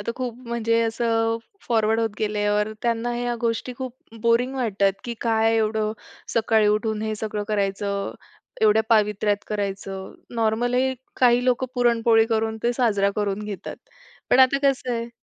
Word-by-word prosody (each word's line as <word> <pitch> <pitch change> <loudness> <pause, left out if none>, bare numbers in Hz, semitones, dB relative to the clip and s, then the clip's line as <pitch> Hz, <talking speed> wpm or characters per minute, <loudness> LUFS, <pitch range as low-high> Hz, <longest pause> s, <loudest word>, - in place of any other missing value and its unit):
आता 205 - -3
खूप 250 -3 -3
म्हणजे 230 -1 +1
असं 225 0 +1 0.3
फॉरवर्ड 225 -1 +2
होत 225 - +1
गेल्यावर 210 0 0
त्यांना 235 0 0
ह्या 240 0 -1
गोष्टी 230 +1 -1
खूप 255 -2 -5 0.3
बोरिंग 235 +3 +2
वाटतात 200 -6 +1
की 240 -1 -4
काय 225 -1 +2
एवढं? 215 -1 0 0.4
सकाळी 220 -1 +3
उठून 215 +1 0
हे 220 0 -2
सगळं 210 -1 -3
करायचं, 200 -1 -1 0.5
एवढ्या 220 0 +5
पावित्र्यात 210 -2 +2
करायचं, 195 -2 -4 0.2
नॉर्मल 230 +2 +1
ही 260 +1 +2 0.3
काही 245 0 +5
लोकं 255 0 +1
पुरणपोळी 230 -2 +3
करून 220 -1 0
ते 240 +1 +2
साजरा 205 -5 +2
करून 205 0 -1
घेतात. 205 -2 -6 0.5
पण - - +5
आता 260 +1 +5
कसं 260 -2 -1
आहे 235 0 -3
225 Hz, 150 wpm, -23 LUFS, 210-240 Hz, 0.5 s, एवढ्या